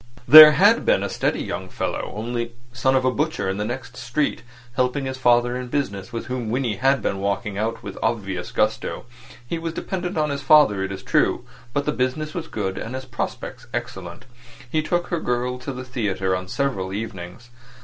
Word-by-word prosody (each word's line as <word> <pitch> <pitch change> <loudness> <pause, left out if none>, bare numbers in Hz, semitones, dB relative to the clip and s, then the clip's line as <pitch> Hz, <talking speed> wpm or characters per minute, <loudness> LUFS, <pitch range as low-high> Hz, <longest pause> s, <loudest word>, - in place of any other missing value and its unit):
There 155 +3 +12
had 205 +9 +5
been - - +2
a - - -2
steady - - -1
young - - -5
fellow, - - -3
only 120 +2 -3 0.2
son 130 +1 +2
of 130 -1 +2
a 130 - +3
butcher 150 -5 -1
in 95 0 -1
the 105 - -2
next 125 +4 -6
street, 130 +5 -1 0.3
helping 130 +2 0
his 130 0 -4
father 120 -1 +3
in 125 0 -4
business, 115 -7 -3
with 115 -1 -5
whom 125 -3 -4
Winnie 120 -3 -1
had 135 +3 +2
been 95 - -1
walking 100 +1 -2
out 110 +3 -2
with - - -7
obvious 95 -5 -2
gusto. - - -1 0.4
He 165 - -3
was 165 0 -4
dependent 180 0 -4
on 150 -1 +1
his 140 0 -3
father, 135 -8 +5
it 95 - -3
is 95 - -7
true; - - +1 0.3
but 145 +3 -1
the - - +1
business 130 +6 -2
was 165 -2 -5
good, 95 -3 -3
and 115 +3 -5
his 130 0 -6
prospects 120 -2 -5
excellent. 85 -2 -6 0.4
He 155 +6 0
took 175 +3 -1
her 175 - -1
girl 125 -1 -2
to 130 +2 -5
the 130 -1 -6
theatre 100 -7 -1
on 90 0 -5
several 110 -7 -2
evenings. 100 +2 -7
125 Hz, 200 wpm, -23 LUFS, 105-140 Hz, 0.4 s, There